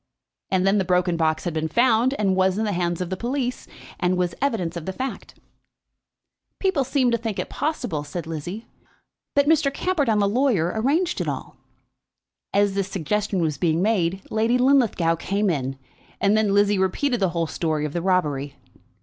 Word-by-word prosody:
And 190 -1 +1
then 195 +1 +3
the - - +2
broken 180 -1 +1
box 160 -1 0
had 175 - -2
been 160 0 -1
found, 240 - +3
and 195 -5 +1
was 190 0 +2
in 220 - 0
the 210 - 0
hands 175 -1 -1
of 180 0 -4
the - - 0
police, 250 +4 -3 0.3
and 180 0 +1
was 180 -1 0
evidence 220 -12 -1
of 170 0 -6
the - - -1
fact. 260 +6 -6 1.2
"People 380 -8 +1
seem 255 -1 +1
to 235 - +1
think 225 -3 -4
it - - -4
possible," 230 - -2
said 165 +4 -6
Lizzie, 165 +7 -6 0.7
"that 285 0 +4
Mr. 300 -2 +3
Camperdown 285 - 0
the 200 -1 +3
lawyer 205 - +1
arranged 300 +11 +1
it - - -3
all." - - -5 1.0
As 200 0 +2
this 195 -1 -1
suggestion 195 +1 -1
was 155 -4 -1
being 165 0 +1
made 190 -3 +1
Lady 225 +3 +2
Linlithgow 245 -11 +3
came 200 +3 0
in, 135 -3 -3 0.4
and 200 +1 +3
then 215 -2 +2
Lizzie 205 0 +3
repeated 240 +7 0
the 190 -2 +2
whole 170 -1 -1
story 155 -2 -2
of 150 - -5
the 170 - -1
robbery. 150 -7 0
195 Hz, 185 wpm, -23 LUFS, 170-235 Hz, 1.2 s, that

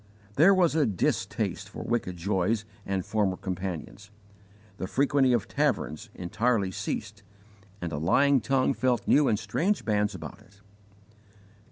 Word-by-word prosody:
There 165 - +6
was 175 -4 +3
a 155 -2 +2
distaste 100 -5 -1
for - - -7
wicked 105 -7 -2
joys 100 +4 0 0.2
and 95 -2 -1
former 100 -4 0
companions; 95 +2 -5 0.7
the 95 - -4
frequenting 135 +1 +3
of 115 - -2
taverns 75 +1 -1
entirely 100 +2 0
ceased, 100 +2 -5 0.6
and 85 - -3
a 70 - -3
lying 135 - +3
tongue 135 -1 +2
felt 125 +2 0
new 145 -1 +5
and 105 - +2
strange 115 - -1
bands 105 -1 +1
about - - -9
it. 100 +1 -22
105 Hz, 140 wpm, -27 LUFS, 95-130 Hz, 0.7 s, There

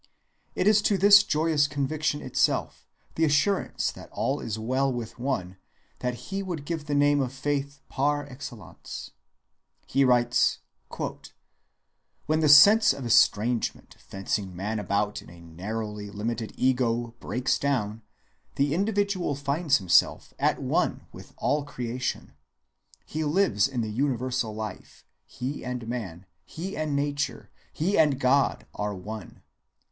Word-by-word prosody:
It - - 0
is 210 0 +5
to 200 - +2
the 200 +3 +4
joyous 160 -7 +5
conviction 145 +1 -2
itself, - - 0 0.3
the 165 - 0
assurance 160 +6 +1
that - - -12
all - - -1
is 110 -1 -4
well 130 +5 0
with 120 -1 -6
one, 95 -9 -2 0.4
that 125 -1 -2
he 190 - -5
would 175 -7 -5
give 160 -1 -4
the 150 -1 -1
name 145 0 +4
of 130 -2 -2
faith 140 +1 -3
par 145 +1 0
excellence. 120 -9 -9 0.8
"When 125 -3 +4 2.1
the 155 -2 +3
sense 200 +7 +8
of 135 -2 -7
estrangement," 115 0 +2
he - - -27
writes, - - -22
"fencing 95 -1 -3
man 105 +4 -3
about 105 +1 -1
in - - -15
a 85 0 -14
narrowly 105 +5 -6
limited 110 +2 -4
ego, 120 -2 +1
breaks 125 +1 -1
down, 115 -6 -1 0.5
the 140 +1 +1
individual 200 -4 0
finds 140 +2 +1
himself 95 -4 +2
'at - - +1
one - - 0
with - - -12
all 145 0 0
creation.' 125 -2 -4 0.7
He 155 +1 -3
lives 145 - +2
in 130 -3 -3
the 110 -1 -3
universal 125 -2 -1
life; 110 0 -8 0.2
he 130 +4 -5
and 125 -2 -5
man, 100 -7 -5 0.2
he 185 - -6
and 155 -2 -2
nature, 145 0 -2 0.2
he 185 +5 0
and 145 -4 +3
God, 135 +1 +2
are 105 0 -3
one. 105 +1 -9
130 Hz, 135 wpm, -26 LUFS, 110-145 Hz, 2.1 s, sense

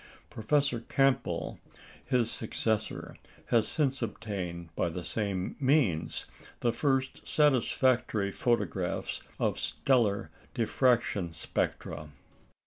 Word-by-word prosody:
Professor 140 +2 +1
Campbell, 135 +2 +1 0.4
his 125 -3 +1
successor, 110 -1 -2 0.3
has 115 -2 +4
since 135 -4 0
obtained, 95 -7 -4
by - - +1
the 90 +2 -5
same 95 -2 -2
means, 130 - +2 0.4
the 120 - +2
first 135 -2 0
satisfactory 125 -6 +2
photographs 120 +3 -1 0.2
of - - +1
stellar 115 -7 +1 0.2
diffraction 115 -7 +2
spectra. 75 -1 -3
115 Hz, 90 wpm, -30 LUFS, 100-130 Hz, 0.4 s, has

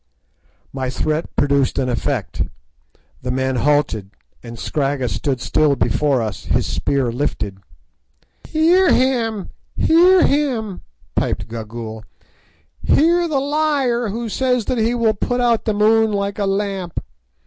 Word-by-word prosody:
My 130 -1 -2
threat 155 +5 -2
produced 140 -2 +2
an 130 - 0
effect; 120 -2 -2 0.8
the 125 - -4
men 130 0 0
halted, 130 -7 +1 0.3
and 115 -1 -9
Scragga 135 -1 -1
stood 135 +1 -2
still 150 +3 +2
before 135 -1 +1
us, 105 -5 -5
his - - +1
spear 125 - 0
lifted. 110 -7 -3 0.9
"Hear 345 +4 +3
him! 230 -6 +1 0.3
hear 355 +3 +5
him!" 245 -9 0 0.3
piped - - -1
Gagool; 110 -1 -7 0.8
"hear 340 +3 +3
the 295 -4 0
liar 280 -5 0
who 230 +3 -4
says 250 0 0
that 255 - -1
he 230 +2 +1
will 230 -2 +2
put 245 +4 -2
out 235 -2 +2
the 215 - +1
moon 220 +1 +4
like 200 0 -2
a 200 - 0
lamp. 195 -3 -2
200 Hz, 130 wpm, -19 LUFS, -, 0.9 s, hear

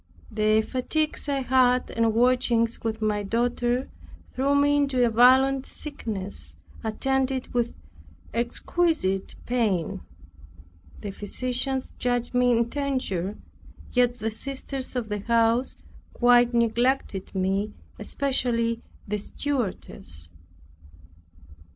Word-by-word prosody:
The 215 0 +3
fatigues 295 +5 -2
I 275 -1 0
had, 255 -1 +3
and 230 -1 +1
watchings 240 -1 +2
with 220 -1 -2
my 210 -1 +1
daughter, 240 +4 0 0.5
threw 275 +2 +1
me 285 0 +4
into 270 -4 +2
a 235 - +1
violent 260 +3 +5
sickness 195 - -6 0.3
attended 265 +3 -1
with 240 -1 0 0.6
exquisite 235 - 0
pain. 215 -9 0 1.0
The 205 - -5
physicians 255 +6 -3
judged 245 -1 -1
me 250 0 +3
in 235 -1 +3
danger, 235 -9 -2 0.6
yet 245 -1 +3
the 225 0 -2
sisters 265 +2 -5
of 245 -3 -2
the 210 -1 -3
house 230 +3 +2 0.4
quite 245 0 +5
neglected 235 -4 0
me; 195 +3 0 0.3
especially 235 -4 0 0.3
the 210 +1 -1
stewardess. 205 - -4
240 Hz, 100 wpm, -26 LUFS, 220-260 Hz, 1.0 s, violent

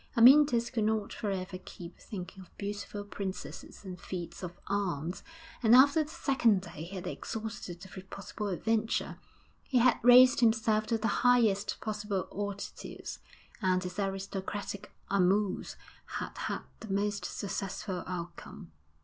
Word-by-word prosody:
Amyntas 245 -1 +7
could 225 -4 0
not 215 -1 0
for 210 - -3
ever 185 -1 -3
keep 175 0 -10
thinking 190 -1 -7
of 185 - -17
beautiful 205 0 -4
princesses 200 0 -6
and 180 -2 -7
feats 170 -2 -6
of 180 -2 -5
arms, 180 -4 -2 0.4
and 230 0 +7
after 280 +5 +7
the 300 - -11
second 240 -10 +2
day 160 -4 -8
he 190 +3 -8
had 185 - -5
exhausted 200 -5 -5
every 190 0 -9
possible 200 +2 -6
adventure; 220 +4 0 0.4
he 260 - 0
had 245 -1 +5
raised 250 +2 +8
himself 220 -2 +3
to 230 - +1
the 225 +1 0
highest 230 -5 +3
possible 210 -3 -2
altitudes, 200 0 -5 0.4
and 185 -1 +2
his 180 +2 -5
aristocratic 195 +1 -4 0.2
amours 195 +1 +2 0.4
had - - -5
had - - -3 0.2
the 220 - -7
most 205 +1 0
successful 195 -1 -3
outcome. 175 - -7
205 Hz, 140 wpm, -31 LUFS, 190-225 Hz, 0.4 s, raised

